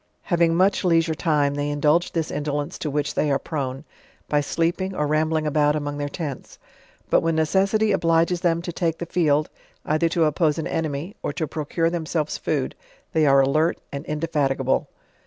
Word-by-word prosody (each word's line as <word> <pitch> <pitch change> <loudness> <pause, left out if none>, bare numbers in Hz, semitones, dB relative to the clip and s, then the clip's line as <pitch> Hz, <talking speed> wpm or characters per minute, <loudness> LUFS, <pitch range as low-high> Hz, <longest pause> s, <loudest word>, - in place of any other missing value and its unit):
Having 170 -2 +2
much 190 +3 +3
leisure 165 -2 +3
time 150 -3 +1
they 145 0 -2
indulge 150 +4 +2
this 165 -2 -1
indolence 145 +2 -3
to 155 - -2
which 145 0 -1
they 150 - +1
are 140 - +3
prone, 140 -2 -4 0.4
by 150 -1 +2
sleeping 175 +6 -1
or 150 - 0
rambling 155 +1 +1
about 150 0 +2
among 145 -1 -3
their 145 0 -2
tents. 145 -3 -6 0.5
But - - +5
when 165 -1 0
necessity 195 +7 +2
obliges 170 -1 +2
them 170 -1 +1
to 175 - -4
take 165 -1 -1
the 170 - -4
field, 155 -3 +1 0.3
either 155 +2 +1
to 170 0 +1
oppose 155 0 +1
an 160 - -3
enemy; 160 +5 -3
or - - -2
to 160 - -2
procure 160 +3 -1
themselree 160 -2 -2
food, - - -1 0.4
they 155 -2 +3
are 135 0 +6
alert 155 +5 +2
and 140 0 -5
indefatigable. 145 -4 0
155 Hz, 175 wpm, -23 LUFS, 145-170 Hz, 0.5 s, are